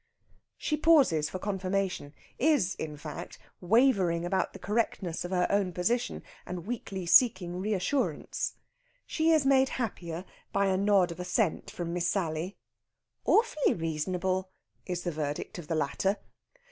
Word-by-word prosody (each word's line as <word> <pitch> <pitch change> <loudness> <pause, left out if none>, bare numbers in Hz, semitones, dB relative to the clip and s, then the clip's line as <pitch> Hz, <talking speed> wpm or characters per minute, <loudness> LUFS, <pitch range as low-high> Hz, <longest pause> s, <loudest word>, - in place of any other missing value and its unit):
She 300 - -1
pauses 275 - +4
for 185 - -4
confirmation 190 -5 -2 0.2
is, 275 - +3
in 150 -2 -6
fact, 150 0 -7 0.2
wavering 185 -5 +3
about 190 +2 0
the - - -10
correctness 205 -5 -1
of 175 - -5
her 180 -1 +2
own 200 -3 +1
position, 235 +8 -1 0.2
and 175 -1 -6
weakly 195 -5 -4
seeking 180 -3 +4
reassurance. 200 - -1 0.5
She 320 0 +1
is 310 -4 +4
made 270 -1 +4
happier 180 -7 -4 0.3
by 200 0 +2
a 190 -1 +2
nod 195 -2 +3
of 170 - -8
assent 180 -2 0
from 170 -1 -4
Miss 175 0 0
Sally. 175 0 -2 0.7
"Awfully 430 - +3
reasonable!" 180 +3 -1 0.4
is 180 -1 -3
the 175 - -1
verdict 150 +2 -4
of 160 - -9
the 165 - -1
latter. 155 +7 0
185 Hz, 140 wpm, -29 LUFS, 170-210 Hz, 0.7 s, pauses